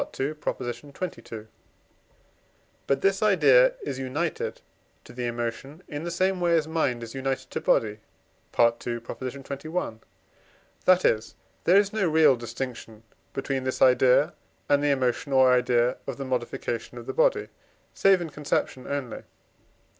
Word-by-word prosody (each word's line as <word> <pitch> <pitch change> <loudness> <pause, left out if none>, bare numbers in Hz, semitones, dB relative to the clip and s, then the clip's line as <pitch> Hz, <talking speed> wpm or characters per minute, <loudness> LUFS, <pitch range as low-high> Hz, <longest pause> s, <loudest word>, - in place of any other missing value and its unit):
xxii.). 135 +3 -1 2.5
But 135 0 +1
this 195 0 +2
idea - - +5
is 130 - -4
united 145 +6 -3 0.4
to - - -14
the 120 0 -3
emotion 120 +7 -5
in 145 0 -6
the 175 - -3
same 185 +2 0
way 170 -1 +3
as 155 -1 0
mind 140 -7 -1
is 115 - -8
united 135 0 -3
to - - -3
body 105 -1 +1 0.6
(II. 120 0 +7 0.3
xxi.); 135 +2 -5 0.9
that 185 0 +5
is, 110 +1 +1 0.3
there 180 +3 +6
is 200 0 +3
no 195 -6 +1
real 155 -3 +5
distinction 120 -2 -7 0.3
between 135 -1 -2
this 130 0 -2
idea 130 +3 +5 0.3
and 145 0 +3
the 145 - +2
emotion 130 0 0
or 130 -1 +6
idea 125 0 +2
of 135 - -4
the 135 - -5
modification 120 -1 -3
of 120 - -8
the - - -4
body, - - +2 0.4
save 195 -2 +4
in 165 -3 -5
conception 140 -3 -2
only. 140 -4 -4
135 Hz, 140 wpm, -26 LUFS, 125-165 Hz, 2.5 s, II